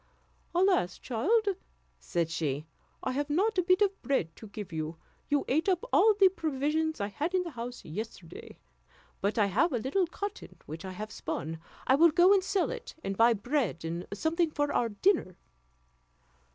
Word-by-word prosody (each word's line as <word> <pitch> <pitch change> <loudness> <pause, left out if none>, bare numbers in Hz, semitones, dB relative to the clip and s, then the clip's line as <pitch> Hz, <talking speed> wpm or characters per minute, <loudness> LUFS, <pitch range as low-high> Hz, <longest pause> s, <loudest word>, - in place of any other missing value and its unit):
"Alas! 360 - +3
child," 405 - +1 0.5
said 170 -2 -1
she, 150 -3 -2 0.4
"I 260 - 0
have 285 +3 -2
not 385 +6 +2
a - - +5
bit 370 +3 +4
of 395 -1 -1
bread 180 -13 -1
to 220 - -10
give 205 -4 -8
you; 160 +1 -4 0.3
you 290 -1 +1
ate 315 +8 +2
up 370 +4 +1
all 435 -1 +6
the 390 -1 +7
provisions 315 -2 -1
I 200 - 0
had 310 - -2
in 365 - +2
the 340 - -6
house 245 -1 -7
yesterday; 180 -1 -8 0.6
but 200 +3 0
I 210 - +4
have 220 - +2
a 250 - 0
little 280 - 0
cotton 405 +5 -6
which 160 +4 -7
I 190 - -6
have 215 +3 -6
spun; 160 +2 -4 0.3
I - - +4
will 330 +5 +7
go 355 +4 +6
and 390 -2 +3
sell 390 0 0
it, - - -7
and 195 - -2
buy 230 +3 +5
bread 225 - -1
and 170 +2 -4
something 320 - +1
for 290 -1 -1
our 235 - +1
dinner." 210 - +1
275 Hz, 180 wpm, -30 LUFS, -, 0.6 s, the